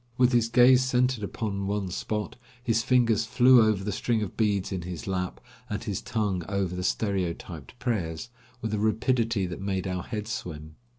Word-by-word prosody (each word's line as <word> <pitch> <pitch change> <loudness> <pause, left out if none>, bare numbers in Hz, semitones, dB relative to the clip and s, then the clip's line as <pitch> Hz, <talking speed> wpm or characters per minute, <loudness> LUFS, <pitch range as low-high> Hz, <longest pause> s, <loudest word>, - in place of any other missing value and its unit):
With 125 0 +4
his 120 -2 +2
gaze 125 +1 +6
centered 125 -2 +1
upon 100 -1 -3
one 100 -2 -1
spot, 105 +3 -3 0.3
his 115 -2 +2
fingers 115 -3 +2
flew 125 +1 +6
over 110 -3 +2
the 105 - -2
string 110 +2 0
of 100 - -6
beads 105 -4 0
in 95 -2 -2
his 85 -1 -6
lap, 90 -1 -3 0.3
and 105 - -3
his 100 -3 -3
tongue 105 -6 -1
over 95 -3 -1
the 90 - -3
stereotyped 90 - -2
prayers, 110 -6 -2 0.3
with 110 -1 -2
a 105 - 0
rapidity 110 -1 +1
that 90 +1 -6
made 95 -1 -2
our 90 -1 -2
head 105 +1 -5
swim. 80 -7 -6
105 Hz, 180 wpm, -27 LUFS, 95-115 Hz, 0.3 s, gaze